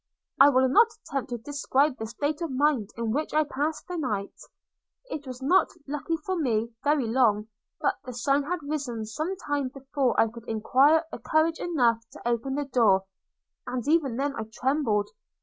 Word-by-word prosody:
I 275 +1 +9
will 260 -1 +4
not 365 - +6 0.2
attempt 275 -2 -4
to 240 - -3
describe 280 +2 0
the 220 - -4
state 290 +7 -2
of 335 - -2
mind 265 -5 +1
in 230 -1 -1
which 300 +5 -2
I 310 - +5
passed 295 +2 -3
the 360 -1 -4
night. 210 -10 -2 0.8
It 290 -2 -5
was 255 0 -7
not, 365 +8 +4 0.2
luckily 295 +3 -2
for 375 - -1
me, 230 -8 0
very 290 -3 +2
long; 220 -3 +2 0.3
but - - 0
the 255 -1 -7
sun 275 +4 +2
had 345 0 -3
risen 275 -7 -3
some 310 - -3
time 290 -5 -2
before 270 -1 -1
I - - +5
could 235 +1 -11
acquire 270 +8 +4 0.2
courage 320 +1 +2
enough 245 -10 +2
to - - -7
open 240 +3 -1
the 290 0 -1
door, 225 -8 +3 0.6
and 250 0 -3
even 295 -6 +2
then 280 +1 -1
I 220 - -4
trembled. 245 -5 0
270 Hz, 180 wpm, -27 LUFS, 235-295 Hz, 0.8 s, I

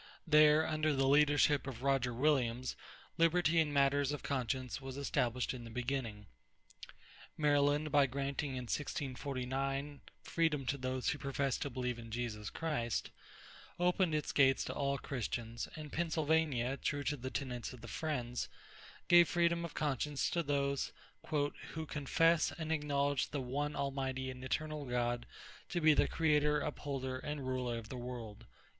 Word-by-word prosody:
There, 150 -1 +6
under 155 -1 +1
the 135 0 +2
leadership 145 0 +4
of 125 -2 -6
Roger 135 -3 +2
Williams, 125 -2 +1 0.4
liberty 165 0 +4
in 155 -2 +2
matters 140 0 +3
of 145 - -4
conscience 130 -1 -2
was 135 0 -7
established 125 -3 0
in 125 -2 -7
the 115 - -8
beginning. 120 -3 -3 1.1
Maryland, 145 0 +3
by 145 -1 +5
granting 140 +1 -2
in 125 - -3
1649 135 +1 -3 0.2
freedom 155 -5 0
to 140 +2 0
those 130 0 -1
who 145 - -2
professed 140 -1 -1
to 140 - -1
believe 125 -2 -3
in 115 -1 -9
Jesus 110 -3 -3
Christ, 150 -9 -2 0.7
opened 180 -2 +2
its 150 - -1
gates 135 -2 +4
to - - -4
all 140 -1 0
Christians; 115 -3 -4
and 155 -2 -8
Pennsylvania, 155 -6 +1
true 145 0 -2
to 145 - 0
the 130 -1 -5
tenets 125 -4 -4
of 125 -3 -11
the 115 - -9
Friends, 125 -2 -3 0.6
gave 175 -1 +7
freedom 170 0 +2
of 170 - -6
conscience 145 -1 0
to 170 - +1
those 140 -2 0 0.4
"who 150 +2 -2
confess 160 +3 +2
and 160 -1 -4
acknowledge 145 -2 +1
the 145 - -3
one 145 +3 -2
Almighty 135 -1 -2
and 130 0 -9
Eternal 150 +2 -2
God 120 -1 -1 0.4
to 175 - -1
be 155 -2 +6
the - - +3
creator, 150 -2 +2
upholder, 135 -3 -3
and 150 -1 -4
ruler 125 -2 -1
of 115 -1 -8
the 130 - -5
World." 115 -3 -7
140 Hz, 150 wpm, -35 LUFS, 125-150 Hz, 1.1 s, gave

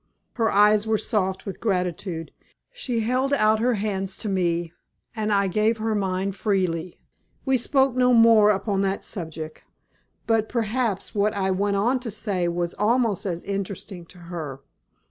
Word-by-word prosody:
Her 225 -2 +1
eyes 210 +1 +4
were 220 0 +2
soft 190 -4 -1
with 195 - -6
gratitude. 180 -4 -2 0.4
She 250 - -2
held 255 +5 0
out 215 -3 +3
her 245 +1 +2
hands 195 -2 -2
to 215 - -4
me, 175 -3 0 0.4
and 215 -1 -1
I 200 -1 +3
gave 215 +4 +1
her 220 0 -1
mine 195 -1 -1
freely. 185 -4 -1 0.5
We 265 -1 +3
spoke 265 +1 +2
no 250 0 +4
more 225 -3 +6
upon 195 -1 0
that 195 0 -1
subject. 160 -5 -6 0.6
But 225 -1 +1
perhaps 230 -3 -1
what 210 +1 +1
I 190 -1 0
went 200 +2 0
on 240 +6 +2
to 245 -2 -6
say 200 -4 -2
was 170 0 -2
almost 220 -2 +1
as 175 -2 -3
interesting 195 -3 -5
to 180 - -16
her. 165 -6 -7
205 Hz, 160 wpm, -24 LUFS, 185-225 Hz, 0.6 s, more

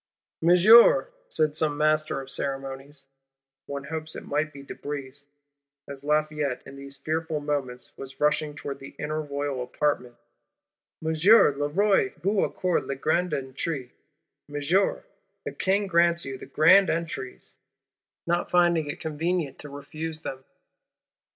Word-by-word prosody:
'Monsieur,' 190 - +7 0.2
said 155 -1 +1
some 155 -2 +1
Master 155 -1 +1
of 135 0 -10
Ceremonies 135 +1 -5 0.6
(one 140 -1 -5
hopes 160 +2 -5
it - - -7
might 155 +2 -1
be 140 -1 -11
de 140 - -8
Brézé), 140 -1 -7 0.6
as 140 -1 -8
Lafayette, 150 -2 0
in 135 - -11
these 140 0 -8
fearful 160 0 -2
moments, 140 -4 -3
was 135 0 -10
rushing 150 0 +1
towards 140 -1 -6
the 135 - -11
inner 155 +1 -3
Royal 140 -2 -3
Apartments, 125 -1 -2 0.9
'Monsieur, 160 +1 +5
le 145 +1 -1
Roi 195 +4 +2
vous 195 +5 +1
accorde 180 -2 -1
les 140 - -2
grandes 175 +6 0
entrées, 130 0 -4 0.6
Monsieur, 150 +7 +1 0.4
the - - -3
King 195 +2 0
grants 170 -2 +3
you 135 0 -5
the - - -10
Grand 185 +5 +5
Entries,'—not 170 +2 -5
finding 170 -4 +3
it 145 - -5
convenient 160 -1 -2
to 145 - -9
refuse 155 +3 -6
them! 130 -2 -6
150 Hz, 135 wpm, -26 LUFS, 140-165 Hz, 0.9 s, Monsieur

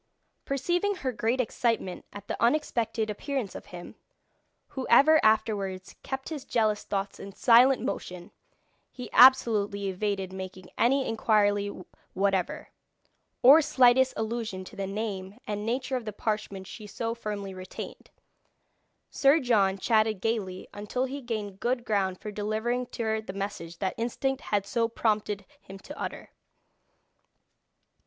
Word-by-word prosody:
Perceiving 350 +9 0
her 270 -8 -2
great 230 +2 -1
excitement 230 -6 -1
at 205 0 -10
the - - -2
unexpected 235 -4 +1
appearance 250 -1 -3
of - - -9
him, 175 -1 -9 0.8
who 265 -2 -5
ever 305 +6 +6
afterwards 200 -4 +1
kept 265 0 -5
his 300 -5 -5
jealous 215 -3 0
thoughts 195 0 -3
in 195 - -9
silent 250 +5 +5
motion, 180 -1 -5 0.6
he 250 -1 -9
absolutely 210 -6 +5
evaded 190 -1 -2
making 185 -1 -8
any 265 +3 +2
inquiry 205 -2 +2 0.5
whatever, 195 -1 0 0.7
or 280 +6 +9
slightest 260 -3 +4
allusion 220 -4 -3
to - - -12
the 195 -1 -3
name 200 -1 -4
and 210 0 -4
nature 255 +2 -1
of 240 - -7
the 215 - -3
parchment 210 -3 -3
she 210 +3 -9
so 230 +2 -3
firmly 205 -4 -5
retained. 185 0 -9 1.0
Sir 280 +3 +4
John 205 -8 +2
chatted 215 0 +2
gaily 190 -4 -2
until 210 +5 -2
he 275 +2 -6
gained 210 -5 -5
good 245 0 -1
ground 195 -4 0
for 210 - -6
delivering 220 +4 -2
to 235 - -5
her 220 0 0
the 200 -3 -8
message 195 -4 -5
that 190 +1 -2
instinct 265 +3 -2
had 205 -2 -1
so 230 +3 0
prompted 210 -3 -1
him 195 - -11
to 290 +9 -10
utter. - - -6
215 Hz, 140 wpm, -28 LUFS, 200-245 Hz, 1.0 s, or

